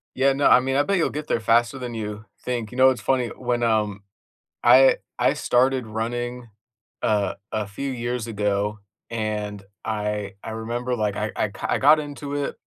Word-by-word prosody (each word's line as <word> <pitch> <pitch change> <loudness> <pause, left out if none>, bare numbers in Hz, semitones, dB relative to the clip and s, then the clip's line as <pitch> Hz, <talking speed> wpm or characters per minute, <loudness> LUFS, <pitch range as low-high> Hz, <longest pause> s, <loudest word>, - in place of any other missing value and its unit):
Yeah, 135 +1 +3
no, 140 +1 +3
I 125 - +7
mean, 135 +1 -1
I 145 - +4
bet 200 +2 +1
you'll 165 - +2
get 150 0 -5
there 115 - +1
faster 120 +4 +2
than 125 -2 -5
you 105 -1 -5 0.2
think, 120 -3 -3
you 125 - -8
know, 130 0 +7
it's 125 -4 -1
funny, 130 -3 +1
when, 120 -1 -2
um, 105 -3 +1 0.6
I 130 +2 +7 0.2
I - - +3
started 130 -1 +1
running, 120 +2 -3 0.5
uh, 105 -3 +1 0.2
a 110 -2 -1
few 135 +7 -4
years 120 -1 -3
ago, 105 -1 -1 0.3
and 105 -3 -3 0.2
I 105 -2 -2
I 110 - -5
remember 120 +3 -3
like, 105 -3 -1
I - - -2
I - - 0
I - - -4
ki - - -14
I - - +2
got 150 +3 +6
into 145 -1 -5
it. 145 -1 -2
120 Hz, 195 wpm, -24 LUFS, 105-130 Hz, 0.6 s, I